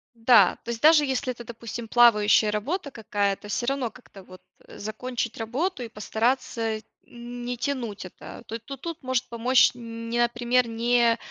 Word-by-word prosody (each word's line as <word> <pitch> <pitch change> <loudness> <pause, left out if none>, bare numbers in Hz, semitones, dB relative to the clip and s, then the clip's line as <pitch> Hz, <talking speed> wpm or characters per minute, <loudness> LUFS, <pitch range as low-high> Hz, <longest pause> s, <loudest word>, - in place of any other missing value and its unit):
Да, 230 +1 +5
то - - -9
есть 230 - -5
даже 305 -1 +6
если 265 -1 -1
это, 240 -1 -9
допустим, 230 0 -7
плавающая 215 -2 +5
работа 280 - -3
какая-то, 205 -3 -2
всё 240 +4 -2
равно 270 -4 -1
как-то 205 -5 -15
вот 185 0 -14 0.3
закончить 235 +2 -5
работу 255 +7 -2
и - - -5
постараться 225 0 -1 0.2
не 245 0 -7
тянуть 240 -7 -3
это, 185 - -11
то 230 - -5
то 275 +5 -9
тут 335 +4 -7
может 255 -1 -1
помочь, 240 +2 +4
не, 230 0 -5
например, 240 +1 +2
не 235 0 +2
235 Hz, 155 wpm, -25 LUFS, 225-255 Hz, 0.3 s, даже